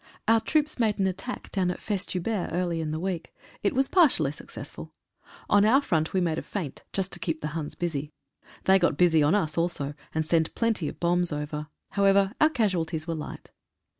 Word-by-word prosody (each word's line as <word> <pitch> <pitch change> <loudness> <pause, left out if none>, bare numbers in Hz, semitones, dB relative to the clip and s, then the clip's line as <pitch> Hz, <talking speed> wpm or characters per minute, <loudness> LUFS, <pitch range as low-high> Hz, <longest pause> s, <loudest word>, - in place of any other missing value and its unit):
Our 225 0 +5
troops 305 +4 +1
made 220 -3 +2
an 195 - +1
attack 190 +7 -4
down 185 -3 +1
at 180 - -3
Festubert 200 0 -1
early 175 -2 0
in 155 - -3
the 155 +1 -2
week. 180 -1 -4 0.3
It 200 - 0
was 270 +1 +3
partially 265 - +4
successful. - - -9 0.5
On 205 0 +5
our 230 +6 +6
front 160 - 0
we 190 - +1
made 165 -3 0
a - - -4
feint, 175 -10 -5
just 195 -1 -2
to 175 - -2
keep 165 -2 -2
the 150 - -2
Huns 150 -1 -4
busy. 150 -4 -3 0.5
They 190 0 +5
got 170 -5 +2
busy 165 -3 +5
on 150 +6 +4
us 165 -5 0
also, 160 -4 -1 0.2
and 160 0 +1
sent 160 0 +1
plenty 225 -9 +1
of - - -7
bombs 175 0 +1
over. 150 0 -4 0.2
However, 200 0 +3
our 310 - +7
casualties 175 - 0
were 165 - -2
light. 155 -2 -7
175 Hz, 195 wpm, -27 LUFS, 160-205 Hz, 0.5 s, our